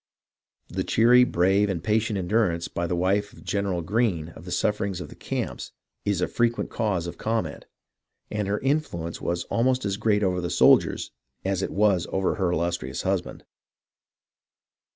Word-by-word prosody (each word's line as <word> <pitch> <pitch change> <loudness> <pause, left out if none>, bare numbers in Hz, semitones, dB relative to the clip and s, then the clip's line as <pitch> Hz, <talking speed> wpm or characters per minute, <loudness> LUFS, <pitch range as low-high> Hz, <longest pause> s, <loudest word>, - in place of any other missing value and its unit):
The - - -3
cheery, 120 +2 +5
brave, 95 -1 +2
and 85 -4 -2
patient 110 0 +1
endurance 90 -3 +1
by 85 0 -3
the 90 - -1
wife 100 +4 0
of - - -15
General 100 -4 -1
Greene 95 -5 0
of 85 - -13
the 90 - -7
sufferings 100 0 0
of - - -7
the - - -12
camps - - -4 0.3
is 100 -3 0
a - - +2
frequent 120 0 0
cause 100 -7 -1
of 85 - -7
comment, 110 -10 -2 0.6
and 105 -2 -2
her 100 +1 0
influence 135 - -1
was 85 0 -1
almost 125 +1 +1
as 100 -1 -1
great 105 -1 +2
over 90 -2 +1
the 85 - -2
soldiers - - +4 0.3
as 95 -1 0
it - - -1
was 100 -4 +2
over 95 -1 +1
her 95 -4 0
illustrious 85 +1 -2
husband. - - -2
100 Hz, 165 wpm, -25 LUFS, 85-110 Hz, 0.6 s, cheery